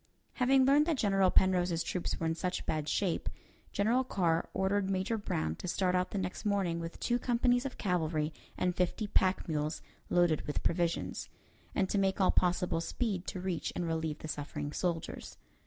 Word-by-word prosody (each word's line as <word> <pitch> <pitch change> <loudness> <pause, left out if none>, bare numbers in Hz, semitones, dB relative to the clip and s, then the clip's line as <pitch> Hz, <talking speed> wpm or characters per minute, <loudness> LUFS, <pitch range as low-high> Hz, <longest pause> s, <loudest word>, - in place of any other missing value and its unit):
Having 260 +1 +4
learned 290 +3 +5
that 325 -4 +1
General 195 -4 +3
Penrose's 180 -3 +3
troops 180 +1 -2
were 165 - -1
in 160 - +1
such 180 +2 -3
bad 155 -1 -1
shape, 190 -4 0 0.4
General 230 +6 +2
Carr 175 -9 0
ordered 195 0 0
Major 195 +4 0
Brown 80 - -2
to - - -6
start 180 +1 +1
out 180 0 +1
the - - -4
next 185 +1 -3
morning 195 -5 0
with 165 0 -6
two 240 0 +1
companies 245 +1 +2
of 260 - -9
cavalry 160 -5 0 0.2
and 180 -1 0
fifty 180 +4 0
pack 190 -2 +1
mules 155 -1 -2 0.3
loaded 175 -3 +3
with 145 - -2
provisions, 170 -1 -1 0.5
and 195 - +2
to 200 - 0
make 195 0 +1
all 190 - +4
possible 180 -2 +1
speed 195 -1 -2
to 185 - -4
reach 180 -3 -2
and 175 - -1
relieve 160 -2 -1
the - - -8
suffering 145 0 -4
soldiers. 170 -3 -3
180 Hz, 180 wpm, -32 LUFS, 165-205 Hz, 0.5 s, learned